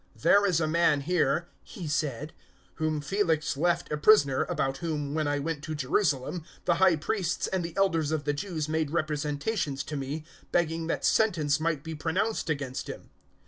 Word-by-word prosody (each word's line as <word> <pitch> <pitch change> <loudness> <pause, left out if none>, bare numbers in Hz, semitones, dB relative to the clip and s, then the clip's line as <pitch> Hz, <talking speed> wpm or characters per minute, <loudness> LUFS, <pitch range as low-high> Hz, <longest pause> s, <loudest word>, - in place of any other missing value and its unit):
"There 205 0 +5
is 175 -4 +2
a 160 - +1
man 155 -2 +3
here," 165 +1 +1
he 175 -5 -8
said, 150 -1 -2 0.4
"whom 155 -2 -1
Felix 160 -2 0
left 170 +3 0
a 150 - 0
prisoner, 150 -6 +4
025:015 - - -16
about 135 0 -1
whom, 150 -2 -3
when 155 -1 0
I 145 0 +1
went 150 0 -3
to 155 -1 -4
Jerusalem, 150 +2 0 0.2
the 170 -2 +2
High 190 -3 +6
Priests 175 +3 -1
and 185 -2 -1
the 170 +2 -6
Elders 165 -6 +2
of 155 -2 -1
the 145 0 0
Jews 155 0 -3
made 160 -1 0
representations 150 0 -1
to 155 - -6
me, 145 +3 -4 0.3
begging 165 -1 0
that - - -1
sentence 160 -10 +2
might 155 -3 -1
be 160 - -5
pronounced 165 +6 -1
against 140 -4 -3
him. - - -9
155 Hz, 185 wpm, -28 LUFS, 145-170 Hz, 0.4 s, High